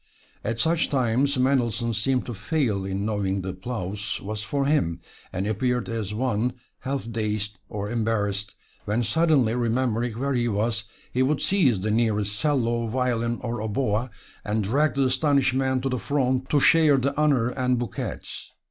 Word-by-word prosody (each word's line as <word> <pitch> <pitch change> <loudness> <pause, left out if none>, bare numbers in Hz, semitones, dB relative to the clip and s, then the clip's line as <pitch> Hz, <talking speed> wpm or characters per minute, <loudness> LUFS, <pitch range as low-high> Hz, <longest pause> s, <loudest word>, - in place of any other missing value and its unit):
At 115 +1 -2
such 160 +6 +2
times 130 +1 +1
Mendelssohn 120 -3 +1
seemed 125 +4 0
to 120 - -5
fail 110 - -1
in 95 +1 -2
knowing 100 -3 -1
the 95 - -3
applause 100 +1 -4
was 105 +1 -4
for 140 +6 -1
him, 90 - +1 0.3
and 95 - -2
appeared 125 +3 0
as 110 -3 -3
one 120 +1 0 0.3
half 135 -2 -3
dazed 105 -3 -2
or 105 -1 -4
embarrassed, 105 -3 -1 0.3
when 110 +4 0
suddenly 145 -4 +3
remembering 120 -1 0
where 140 +2 -1
he 120 -2 +1
was, 110 +1 0 0.3
he 125 - +1
would 140 +2 +2
seize 140 - +2
the 105 +2 0
nearest 105 -2 +1
'cello, 120 -6 +1
violin 120 -1 0
or 120 -2 -3
oboe, 110 +1 0 0.3
and 105 0 0
drag 140 +10 +2
the 135 - +2
astonished 135 0 +2
man 130 -1 +1
to 135 - -1
the 125 -1 -1
front 130 -1 0
to 145 - +4
share 155 -1 +5
the 135 +2 0
honors 135 -5 +2
and 125 -1 +1
bouquets. 120 -1 -4
120 Hz, 165 wpm, -25 LUFS, 105-130 Hz, 0.3 s, share